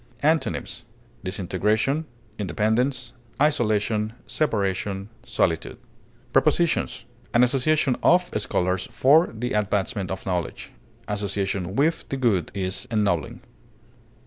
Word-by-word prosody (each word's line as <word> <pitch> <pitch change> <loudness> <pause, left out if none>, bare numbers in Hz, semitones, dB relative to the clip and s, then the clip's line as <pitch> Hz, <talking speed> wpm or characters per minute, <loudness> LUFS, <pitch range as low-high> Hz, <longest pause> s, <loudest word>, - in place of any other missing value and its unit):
Antonyms: 155 +2 0 0.4
disintegration, 105 - 0 0.3
independence, 110 - 0 0.3
isolation, 110 -6 +1
separation, 100 -6 -1
solitude. 105 -9 -1 0.6
Prepositions: 170 -2 +2 0.3
An 120 - +6
association 135 +2 +2
of 180 +1 +4
scholars 90 -1 0
for 155 +6 +5
the 120 +2 -3
advancement 100 -1 0
of 95 - -5
knowledge; 90 -3 -3 0.4
association 100 -2 -2
with 155 +5 +1
the 135 - -2
good 110 - +1
is 95 -1 -3
ennobling. 100 - 0
105 Hz, 95 wpm, -24 LUFS, 95-130 Hz, 0.6 s, An